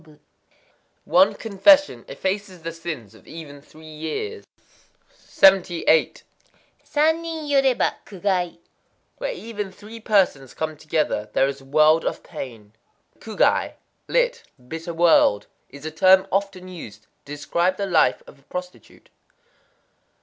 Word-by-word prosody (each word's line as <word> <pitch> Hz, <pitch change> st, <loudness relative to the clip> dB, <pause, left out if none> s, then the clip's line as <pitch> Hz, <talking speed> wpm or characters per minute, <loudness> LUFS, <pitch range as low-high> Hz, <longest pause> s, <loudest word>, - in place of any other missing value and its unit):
_ 155 Hz, -2 st, -20 dB, 0.9 s
One 280 Hz, +2 st, +4 dB
confession 275 Hz, +8 st, +3 dB
effaces 190 Hz, -2 st, -4 dB
the 165 Hz, -, -4 dB
sins 160 Hz, -, -7 dB
of -, -, -20 dB
even 145 Hz, -3 st, -10 dB
three 155 Hz, +2 st, -17 dB
years. 160 Hz, -, -6 dB, 0.7 s
78.—San 195 Hz, -, +1 dB
nin 325 Hz, -2 st, -5 dB
yoréba, 270 Hz, -3 st, +2 dB
kugai. 185 Hz, -3 st, -2 dB, 0.6 s
Where -, -, -2 dB
even 215 Hz, -, -6 dB
three 215 Hz, +4 st, -12 dB
persons 190 Hz, -, +1 dB
come 155 Hz, 0 st, -3 dB
together, 150 Hz, -8 st, -2 dB
there 135 Hz, -, +3 dB
is 140 Hz, 0 st, -5 dB
a -, -, -17 dB
world 155 Hz, +3 st, +4 dB
of -, -, -3 dB
pain. 115 Hz, -10 st, -9 dB, 0.5 s
Kugai 220 Hz, -1 st, 0 dB, 0.3 s
(lit.: -, -, +1 dB, 0.3 s
"bitter 165 Hz, +4 st, -6 dB
world") 165 Hz, -11 st, +4 dB, 0.2 s
is 140 Hz, +2 st, -12 dB
a 155 Hz, -, -4 dB
term 185 Hz, +4 st, +5 dB
often 195 Hz, -1 st, -2 dB
used 115 Hz, -, -10 dB, 0.2 s
to 145 Hz, -, -8 dB
describe 170 Hz, +5 st, -1 dB
the 200 Hz, -, -2 dB
life 175 Hz, -5 st, +2 dB
of 140 Hz, -, -16 dB
a -, -, -27 dB
prostitute. 180 Hz, 0 st, -9 dB
175 Hz, 125 wpm, -23 LUFS, 155-205 Hz, 0.9 s, term